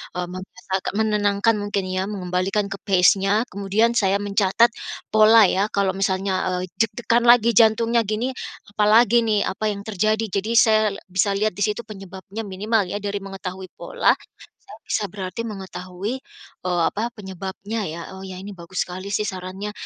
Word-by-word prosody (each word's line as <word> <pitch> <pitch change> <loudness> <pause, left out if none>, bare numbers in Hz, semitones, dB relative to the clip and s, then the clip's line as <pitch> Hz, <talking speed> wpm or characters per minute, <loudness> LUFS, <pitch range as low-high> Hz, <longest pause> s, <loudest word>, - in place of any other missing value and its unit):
eee, 180 - -1
membes 185 0 -10
agak 190 +1 -1
menenangkan 210 0 +2
mungkin 205 -1 -2
ya, 185 +1 -1
mengembalikan 195 +1 -1
ke 195 - -5
pace-nya. 195 +2 +4
Kemudian 200 +4 +1
saya 195 -1 +2
mencatat 205 +3 +3 0.4
pola 220 +1 +7
ya, 195 +3 +1
eee, - - -25
kalau 200 -1 +2
misalnya, 190 -1 0
eee, 185 0 -5
deg-degan 235 +1 +1
lagi 235 -1 +6
jantungnya 230 +2 +4
gini 220 +5 -1 0.4
apalagi 215 +3 +5
nih, 210 -2 +2
apa 215 +3 -2
yang 200 -1 -6
terjadi. 215 +1 0
Jadi 200 +3 -2
saya 220 -2 +5 0.3
bisa 190 +2 +2
lihat 215 +2 +1
di 205 - -1
situ 210 +2 -2
penyebabnya 195 0 -8
minimal 205 +1 0
ya 190 - -3
dari 205 0 -2
mengetahui 190 -1 -7
pola, - - +2 0.5
saya - - -11
bisa 215 - -1
berarti 190 +2 -5
mengetahui, 190 +3 -6 0.5
eee, 180 -1 +1
apa, 225 +3 -3
penyebabnya 195 +2 -5
ya. 165 +2 -6
Oh 190 - -9
ya 190 -1 -7
ini 200 +2 -8
bagus 175 +1 -3
sekali 185 +2 -7
sih 210 +1 0
sarannya, 190 +2 -5
200 Hz, 165 wpm, -22 LUFS, 190-215 Hz, 0.5 s, pola